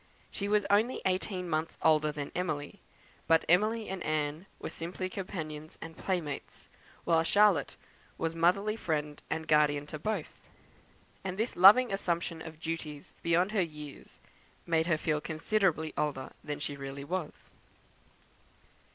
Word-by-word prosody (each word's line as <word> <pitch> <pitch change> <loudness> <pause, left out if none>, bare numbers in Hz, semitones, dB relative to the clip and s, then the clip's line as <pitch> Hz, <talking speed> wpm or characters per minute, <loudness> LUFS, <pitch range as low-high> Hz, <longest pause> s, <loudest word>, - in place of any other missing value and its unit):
She 200 - -3
was 210 0 +3
only 220 +5 +3
eighteen 185 0 -1
months 160 0 -2
older 155 -1 +4
than 145 -1 -5
Emily; 170 +1 -3 0.5
but 165 0 +4
Emily 215 +6 +3
and 190 -1 -4
Anne 155 +3 -1
were - - -6
simply 185 +3 -4
companions 160 -6 -6
and 165 0 -8
playmates, 165 -6 -4 0.3
while 165 -1 +4
Charlotte 190 -3 +4 0.4
was 165 0 -1
motherly 185 +6 +2
friend 150 -7 -2
and 160 0 -3
guardian 145 -1 +3
to 155 +1 -7
both; 205 -1 -3 0.8
and 190 -1 -4
this 225 +3 -1
loving 200 +6 +8
assumption 170 -3 -1
of 160 -1 -9
duties 160 -3 -5
beyond 175 +4 +2
her 210 -3 +2
years, 150 -4 -7 0.5
made 165 -1 +2
her 165 -3 +3
feel 155 -1 0
considerably 160 0 0
older 135 -3 -2
than 145 -1 -4
she 145 0 -3
really 140 0 -6
was. 175 +1 -5
165 Hz, 140 wpm, -31 LUFS, 150-190 Hz, 0.8 s, loving